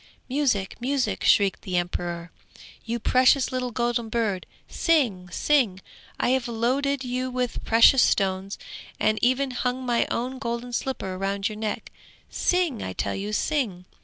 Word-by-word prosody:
'Music, 250 -9 0
music!' 265 +1 -1
shrieked 200 -2 +4
the 185 -2 -2
emperor. 175 -1 -3 0.5
'You 235 0 -2
precious 255 +3 +3
little 255 -1 -2
golden 240 -1 -1
bird, 215 -5 -1 0.2
sing, 235 - +1
sing! 230 -2 +2 0.4
I - - +2
have 260 -1 +1
loaded 260 +4 0
you 255 +1 -2
with 250 -1 -2
precious 230 +3 +6
stones, 195 0 +1 0.4
and 215 0 +2
even 260 +2 +2
hung 250 +1 -2
my 240 -1 +1
own 255 +2 -2
golden 235 0 -4
slipper 195 -8 -3
round 195 +1 -1
your 215 - -7
neck; 215 -1 -4 0.4
sing, 355 -10 +1
I 95 - -4
tell 100 - -2
you, 205 +2 -4
sing!' 215 -6 -1
235 Hz, 145 wpm, -25 LUFS, 195-255 Hz, 0.5 s, precious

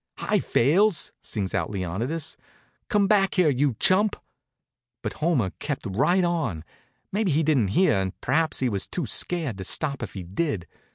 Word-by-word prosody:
"Hi, - - +1
Fales!" 175 - +2
sings 100 -4 -4
out 95 -4 -1
Leonidas. 110 - -2 0.5
"Come 205 -3 +3
back 195 -1 +3
here, 180 -5 +4
you 135 -2 +1
chump!" 205 +3 +4 0.9
But 105 - -3
Homer 145 - +1
kept 145 -3 -4
right 140 - +2
on. 150 - -1 0.5
Maybe 205 0 0
he 160 +1 +2
didn't 140 -9 +2
hear, 180 - +4
and 95 -1 -4
perhaps 155 +4 0
he 130 - +2
was 100 -5 -2
too 175 - -3
scared 145 - 0
to - - -4
stop 140 +8 0
if - - -6
he 95 - -5
did. 95 - -2
145 Hz, 165 wpm, -25 LUFS, -, 0.9 s, here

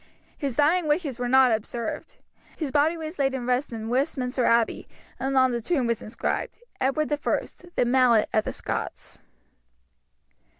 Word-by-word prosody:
His 275 -5 -3
dying 315 +5 +3
wishes 295 -5 0
were 245 - -1
not 260 -1 +6
observed. 225 +1 -4 0.4
His 300 -5 -3
body 305 +4 +2
was 315 +1 -7
laid 270 -1 +1
in 250 -2 -4
rest 250 +3 0
in 225 -1 -5
Westminster 255 0 0
Abbey, 230 -1 +2 0.3
and 270 0 -1
on 260 -1 +5
the 235 -1 -2
tomb 265 +1 0
was 235 -2 -1
inscribed, 215 - -3 0.2
"Edward 285 +3 0
I - - +1 0.6
the - - +2
mallet 240 -3 +4
of 215 - +2
the - - -2
Scots." - - -5
260 Hz, 160 wpm, -25 LUFS, 240-290 Hz, 0.6 s, not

